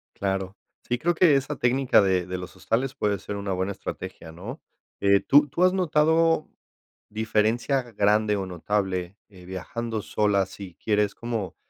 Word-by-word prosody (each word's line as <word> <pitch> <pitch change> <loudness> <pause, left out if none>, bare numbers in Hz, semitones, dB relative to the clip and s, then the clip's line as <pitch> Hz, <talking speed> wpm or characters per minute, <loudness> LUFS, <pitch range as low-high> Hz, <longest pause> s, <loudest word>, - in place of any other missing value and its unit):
Claro. 95 0 -2 0.3
Sí, 120 - -1
creo 170 +7 +1
que 160 -4 +5
esa 140 +1 -1
técnica 125 -1 +3
de 95 -2 +1
de 90 0 -4
los 90 +1 -8
hostales 125 +8 -1
puede 105 -5 0
ser 100 +2 -6
una 100 -1 -4
buena 95 +2 -1
estrategia, 80 - -7
¿no? 105 - -8 0.4
Eh, 100 0 +4
¿tú 145 +9 +5
tú 170 +6 -1
has 185 0 +5
notado 165 -2 +2 0.6
diferencia 110 +5 +1
grande 105 +1 +2
o 95 - -2
notable, 95 0 -2
eh, 90 -3 -15
viajando 110 +4 -4
sola 100 -2 +1
si 95 -2 -10
quieres 105 -2 0
como, 115 -5 -4
105 Hz, 160 wpm, -25 LUFS, 95-130 Hz, 0.6 s, que